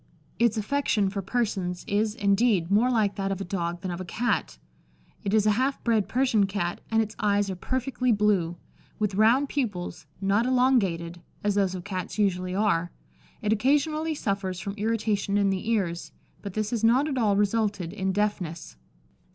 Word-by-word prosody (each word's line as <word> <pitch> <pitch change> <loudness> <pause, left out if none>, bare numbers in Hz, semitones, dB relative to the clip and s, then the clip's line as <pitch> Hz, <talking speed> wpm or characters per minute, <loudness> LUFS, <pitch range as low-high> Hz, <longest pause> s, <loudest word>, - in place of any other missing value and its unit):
Its 235 -1 +3
affection 215 -3 +1
for 200 0 -3
persons 190 -4 -2
is, 210 +1 0
indeed, 200 -4 +2
more 225 +5 +4
like 215 -5 +1
that 195 0 -1
of 195 - -2
a - - -3
dog 175 -1 -3
than 185 -2 -3
of 175 +1 -5
a - - -3
Cat. 225 +7 -1 0.7
It 200 - -1
is 215 -1 +3
a 215 - +5
half 260 +6 0
bred 225 -4 +1
Persian 235 -6 +2
Cat, 175 -3 -3
and 225 0 +3
its 215 0 -8
eyes 205 -1 +1
are - - -4
perfectly 255 +4 -1
blue, 200 -6 +2 0.4
with 210 -2 -1
round 230 +8 +4
pupils, 205 -13 -3
not 200 +5 +2
elongated, 195 -10 +1 0.2
as 205 0 +2
those 195 -2 +1
of 180 - -6
Cats 185 -1 -5
usually 185 -3 0
are. 180 -5 +1 0.5
It 210 +1 +2
occasionally 300 +7 +1
suffers 195 -7 -2
from 200 +1 -4
irritation 210 -1 0
in 200 -1 +3
the 195 +3 -3
ears, 180 -7 -1 0.3
but 200 -2 -7
this 215 -1 -1
has 230 -2 -2
not 250 +6 +4
at 270 -4 -1
all 210 -4 +3
resulted 205 -4 0
in 190 -2 -1
deafness." 185 - -2
205 Hz, 175 wpm, -26 LUFS, 190-230 Hz, 0.7 s, a